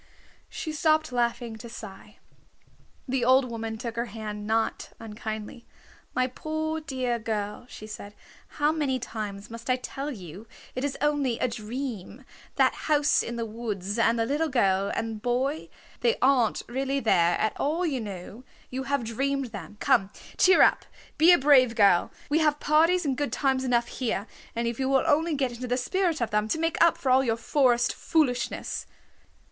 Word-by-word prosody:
She 315 - -5
stopped 310 -1 +2
laughing 235 -1 -1
to 235 +2 -10
sigh. 210 -2 -10 0.9
The 260 -1 0
old 255 0 +4
woman 225 -1 -4
took 235 0 -5
her 235 - 0
hand 210 -1 -6
not 225 0 0
unkindly. 220 +1 -7 0.5
"My 255 - +3
poor, 315 +4 -3
dear 255 -5 -2
girl," 215 +1 -4
she 215 - -9
said, 210 -1 -9 0.4
"how 295 +1 +3
many 290 -5 0
times 210 -4 -6
must 230 +2 -8
I 255 - +4
tell 270 +3 -5
you 195 - -9 0.3
it 255 - -4
is 285 -1 -2
only 285 -5 +1
a - - +1
dream, 235 0 -6 0.3
that - - +4 0.2
house 295 0 +4
in 235 - -5
the 230 -1 -2
woods 215 -2 -4
and 230 +1 +3
the 225 - +1
little 295 +6 0
girl 195 -6 +2
and 225 -1 -3
boy? 260 +6 -1 0.3
They 470 0 +2
aren't 255 -4 +3
really 270 +3 -1
there 175 -8 +3
at 215 - 0
all, 325 +5 0
you 275 -7 -1
know. 205 +3 -8 0.3
You 265 +1 -4
have 280 -2 0
dreamed 270 +2 -2
them. 210 0 -9
Come, 195 - +3 0.3
cheer 375 +1 +6
up. - - +4 0.4
Be 325 +3 +8
a 350 - +7
brave 260 -4 +5
girl. 200 -5 +4 0.2
We 295 +2 +2
have 300 -2 +2
parties 330 +4 +3
and 270 -2 +1
good 290 +1 -2
times 265 -2 +1
enough 240 -2 +2
here, 225 -5 -2 0.3
if 235 +1 -2
you 265 0 0
will 270 -1 +3
only 320 +1 +2
get 265 -3 0
into 245 +1 -6
the 245 +1 0
spirit 335 +4 0
of 230 -2 -1
them, 210 0 +1
to 220 - 0
make 330 0 +2
up 335 - +4
for 260 - 0
all 260 +1 +5
your 230 -3 0
forest 240 -1 +2
foolishness." 255 -7 -1
245 Hz, 175 wpm, -27 LUFS, 220-285 Hz, 0.9 s, Be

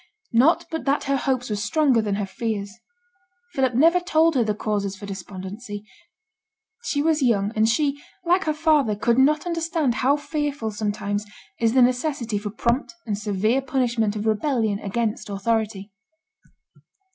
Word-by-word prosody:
Not 265 +9 +4
but 320 - -4
that 280 +1 +1
her 275 0 0
hopes 255 -3 -1
were - - +1
stronger 265 +2 +2
than 205 -2 -1
her 205 0 -2
fears. 200 0 -4 0.8
Philip 260 -5 +1
never 330 +7 +5
told 330 -2 +3
her 255 -4 +3
the 210 -1 -1
causes 200 -2 -2
for 205 - -8
despondency; 200 +2 -7 1.0
she 285 -10 -1
was 315 -1 +2
young, 210 -5 +2
and 220 +1 +3
she, 285 +3 0 0.2
like 360 +3 +3
her 310 - +1
father, 300 -8 +3
could 235 +4 +2
not 295 +4 +3
understand 330 -5 0
how 270 +3 +4
fearful 290 -6 -3
sometimes 205 -1 -2 0.4
is 230 -1 +2
the 255 -1 +6
necessity 245 -3 0
for 205 0 -5
prompt 235 - -1
and 210 - -1
severe 210 +4 0
punishment 235 -5 0
of 210 0 -3
rebellion 220 -2 +1
against 215 +1 -2
authority. 205 0 -2
235 Hz, 155 wpm, -23 LUFS, 210-285 Hz, 1.0 s, the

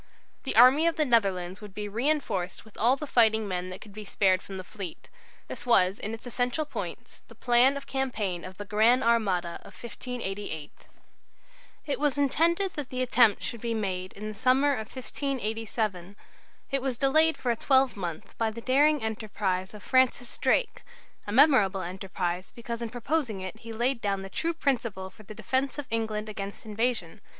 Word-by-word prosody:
The 265 - -1
army 260 +8 +7
of 335 - +1
the 310 -2 +2
Netherlands 195 -6 +1
would 205 -3 -11
be 210 0 -4
reinforced 220 -6 -1
with 220 - -18
all 240 +4 +3
the 300 - -6
fighting 220 -5 +3
men 180 -1 -3
that 185 0 -8
could 210 - -12
be 215 +1 -7
spared 190 -2 +2
from 195 - -8
the 185 - -6
fleet. 185 -3 -8 0.4
This - - -7
was 195 -5 +3
in 215 - -4
its 225 - -15
essential 245 +5 -1
points - - -7
the - - -15
plan 250 +3 +4
of 280 - -8
campaign 215 -10 -2
of 185 0 -9
the 205 - -6
"Gran' 225 +5 +4
Armada" 195 -7 +1
of - - -14
1588. 205 - -6 1.0
It 280 -4 -2
was 290 -1 +1
intended 335 +7 +2
that 290 -4 -5
the 255 0 -1
attempt 240 -4 +4
should 235 -3 -4
be 230 -1 -1
made 185 -3 -3
in 210 +2 -7
the 215 - -5
summer 255 +6 +3
of 220 -4 -4
1587. 220 -8 -3 0.6
It 275 -1 +1
was 260 -2 -2
delayed 315 +5 +3
for 245 - 0
a - - +1
twelvemonth 220 - 0
by 225 - +2
a - - -1
daring 270 +4 +3
enterprise 205 -3 -2
of 205 - -11
Francis 255 -2 +2
Drake, - - +1 0.5
a - - -3
memorable 220 -7 +5
enterprise, 185 0 -3
because 235 0 -5
in 235 - -3
proposing 245 -2 -1
it 190 +4 -7
he 230 0 -9
laid 240 +2 0
down 195 -2 -1
the 195 - -7
true 335 0 -1
principle 230 -11 -1
for - - -16
the 215 0 -11
defence 260 +6 -1
of 290 - -4
England 220 -1 -1
against 200 0 -6
invasion. 220 -4 -2
225 Hz, 180 wpm, -28 LUFS, 195-260 Hz, 1.0 s, army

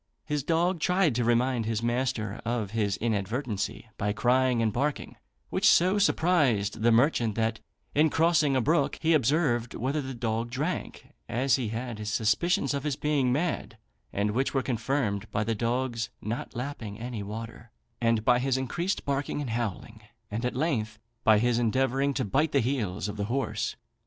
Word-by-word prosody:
His 150 -1 -1
dog 170 +3 +1
tried 180 -2 +2
to 120 +1 0
remind 120 0 +1
his 115 0 -1
master 120 -3 -1
of 115 -4 -2
his 105 -3 0
inadvertency 110 +1 -2
by 105 0 0
crying 125 +2 +2
and 110 -2 +1
barking, 145 +3 -2 0.4
which - - +2
so 185 +4 +4
surprised 140 - +2
the 120 +1 +4
merchant, 115 -3 +3
that, 115 -1 0 0.3
in 155 +2 +4
crossing 160 -3 +3
a 130 - +3
brook, 160 +8 +1
he 165 0 +2
observed 135 -4 +1
whether 135 +6 -1
the 130 -1 -6
dog 115 0 -2
drank, 145 +9 -4 0.2
as 130 +3 +2
he 125 -4 -2
had 115 +1 -4
his 105 0 -3
suspicions 115 - +1
of 140 -1 -2
his 150 -3 -1
being 140 -4 +1
mad; 155 +6 -1 0.3
and 100 +1 0
which 130 +5 -1
were 135 - +2
confirmed 115 -4 -1
by 105 - -1
the 115 +1 0
dog's 120 0 -1
not 115 +4 -5
lapping 115 -5 -5
any 120 -2 -5
water, 110 +3 -7 0.3
and 115 -2 +2
by 125 -1 +5
his 130 0 +1
increased 170 - -2
barking 140 +1 -1
and 135 -5 -3
howling, 110 -1 -4 0.3
and 115 +4 -2
at 125 - -1
length 115 -7 -1 0.3
by 110 -1 +6
his 120 +2 +2
endeavouring 135 +4 +1
to 130 - 0
bite 145 +10 +1
the 140 - +4
heels 110 -7 -1
of 105 0 -5
the 100 - -1
horse. 130 +5 -2
120 Hz, 175 wpm, -28 LUFS, 110-140 Hz, 0.4 s, by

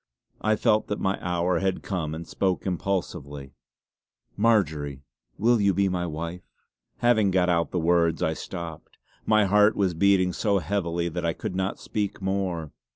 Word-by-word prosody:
I 110 0 +2
felt 110 0 +2
that 105 - -3
my 95 +1 0
hour 90 0 0
had 95 0 -1
come 80 -5 -3
and 85 +1 -7
spoke 95 -2 -1
impulsively: 80 -7 -3 0.8
"Marjory, 80 - +1 0.3
will 115 +1 +3
you 100 -2 +3
be 100 0 +2
my 90 -1 -2
wife?" 85 +3 -5 0.6
Having 110 -4 +4
got 90 -1 +2
out 85 -1 +1
the - - -3
words 85 -1 +2
I 80 - +1
stopped. 85 -1 -8 0.3
My 110 -1 +4
heart 105 +2 +4
was 95 -3 +1
beating 95 +1 +3
so 100 +1 +1
heavily 85 -3 -1
that 85 +1 -4
I 85 -1 +1
could 90 - -5
not 95 +1 -1
speak 105 -2 -3
more. 95 -5 -2
90 Hz, 160 wpm, -26 LUFS, 85-100 Hz, 0.8 s, Having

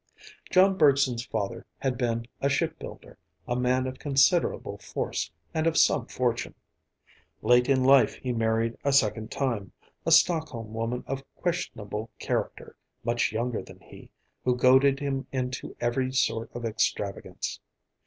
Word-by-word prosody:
John 190 +1 +4
Bergson's 135 -5 +4
father 105 -3 -3
had 130 -2 -1
been 115 -2 -1
a 140 - +1
shipbuilder, 140 - -4 0.3
a 120 - -1
man 125 +1 +1
of 130 0 -5
considerable 145 +4 +2
force - - -3 0.2
and 160 0 +1
of 165 - +1
some - - +4
fortune. 120 -2 -2 0.9
Late 125 +3 +4
in 130 -2 +3
life 135 0 +5
he 130 - -4
married 115 0 0
a 140 - +1
second 110 -3 +2
time, 115 -9 -2 0.3
a - - -1
Stockholm 130 -11 +3
woman 115 +2 -2
of 135 0 -4
questionable 110 - -3
character, - - -3 0.3
much 120 -1 +1
younger 115 +2 -2
than - - -14
he, - - -15 0.3
who 125 -1 +2
goaded 130 +2 +5
him 135 -1 -2
into 130 -1 -4
every 130 +2 0
sort 115 -3 0
of 120 -1 -4
extravagance. 105 -2 -2
125 Hz, 140 wpm, -27 LUFS, 115-135 Hz, 0.9 s, life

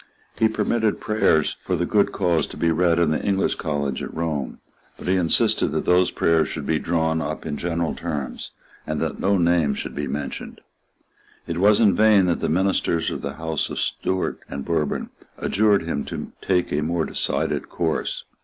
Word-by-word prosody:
He 110 - +3
permitted 110 -1 0
prayers 95 -8 +2
for 90 - -2
the 90 0 0
good 100 +2 +2
cause 85 -5 +1
to - - -10
be 85 - +2
read 85 0 +2
in 85 -2 +3
the 80 - 0
English 95 -1 +1
College 70 -4 -2
at - - -5
Rome; 80 -5 -3 0.4
but - - -9
he 95 - +3
insisted 85 -3 +2
that - - -1
those 90 0 +4
prayers 80 -1 +2
should - - -5
be 80 -1 +1
drawn 80 -1 0
up 80 -1 -4
in 75 -2 -3
general 85 0 -1
terms, 75 -6 -5 0.4
and 75 -1 -2
that - - -2
no 100 +1 +2
name 85 -5 +2
should - - -5
be - - -3
mentioned. 70 -1 -5 0.9
It 85 0 -3
was 105 +2 +5
in 105 -4 +5
vain 110 -3 +5
that 85 -2 +1
the - - -1
ministers 85 -1 +1
of - - -4
the - - -4
Houses 80 -1 -2
of - - -4
Stuart 95 0 -1
and 70 -1 -5
Bourbon 80 -4 -1 0.3
adjured 105 -3 +2
him 80 -4 -2
to - - -6
take 90 -2 0
a 75 - +1
more 80 +1 0
decided - - -1
course. 80 -3 -2
85 Hz, 190 wpm, -23 LUFS, 80-95 Hz, 0.9 s, was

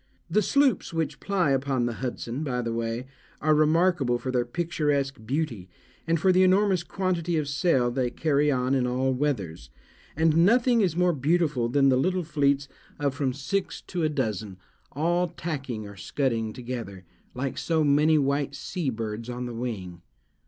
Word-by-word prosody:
The 215 - +4
sloops 275 +1 +2
which 165 -2 -2
ply 185 -7 +1
upon 135 -2 +1
the 120 - -1
Hudson, 125 +2 -4
by 125 -4 -2
the 115 0 -2
way, 115 +2 -3 0.3
are 155 +1 +3
remarkable 155 -4 +3
for 130 +1 -4
their 125 -1 +1
picturesque 145 -4 -1
beauty, 125 - -2 0.4
and 165 0 +2
for 185 +4 +4
the 185 0 +4
enormous 190 -1 +4
quantity 175 -2 -1
of 150 -2 -1
sail 140 -4 +2
they 125 0 0
carry 150 +2 +1
on 130 0 0
in 130 -2 +2
all 130 +1 0
weathers; 100 - -2 0.5
and 160 +1 +3
nothing 235 +3 +4
is 180 -6 +1
more 180 0 +3
beautiful 150 -4 +1
than 135 +2 +4
the 130 - +4
little 185 +6 +1
fleets 140 -3 +1 0.3
of 140 -2 0
from 135 -1 -1
six 140 +9 -3
to 180 - -4
a 155 - +2
dozen, 110 -8 -3 0.3
all 175 +5 +1
tacking 140 -10 -5
or 100 - -11
scudding 115 +1 -1
together, 115 -6 -7 0.3
like 130 +1 -3
so 160 -2 +1
many 150 +2 +4
white 140 0 0
sea 170 -1 -3
birds 115 0 -4
on 125 0 -4
the 120 - -5
wing. 100 -8 -5
140 Hz, 170 wpm, -26 LUFS, 125-165 Hz, 0.5 s, The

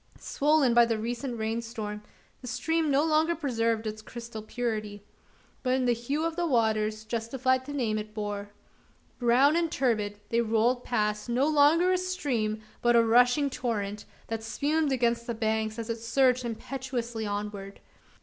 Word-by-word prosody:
Swollen 290 -4 +2
by 240 0 +7
the 230 -1 0
recent 235 +3 -4
rain 220 +1 -2
storm, 215 -3 -6 0.4
the 250 - -8
stream 320 +5 0
no 285 +2 +3
longer 320 +1 +2
preserved 230 -7 -1
its 215 0 -4
crystal 235 -1 -8
purity; 215 -3 -4 0.6
but 255 0 +1
in 260 -1 0
the 245 - +3
hue 275 +7 -2
of 330 - -1
its 350 - -3
waters 220 -7 +1
justified 255 +3 0
the - - -5
name 230 -7 -1
it 215 0 -7
bore. 205 -1 -4 0.7
Brown 255 +5 +4
and 335 -1 +1
turbid, 215 -5 0
they 235 0 +2
rolled 235 +2 +1
past 210 -1 -1
no 255 +4 +2
longer 310 +4 +4
a 370 - +2
stream, 245 -13 -2 0.2
but 240 0 +4
a 230 -1 +5
rushing 245 +5 +4
torrent 210 -6 -3 0.2
that 225 -1 -4
spumed 290 +6 0
against 235 -2 +1
the 235 - -2
banks, 220 0 -1
as 230 -1 -4
it 230 -1 -2
surged 250 +2 +2
impetuously 240 -1 -4
onward. 205 -1 -5
235 Hz, 165 wpm, -28 LUFS, 220-270 Hz, 0.7 s, by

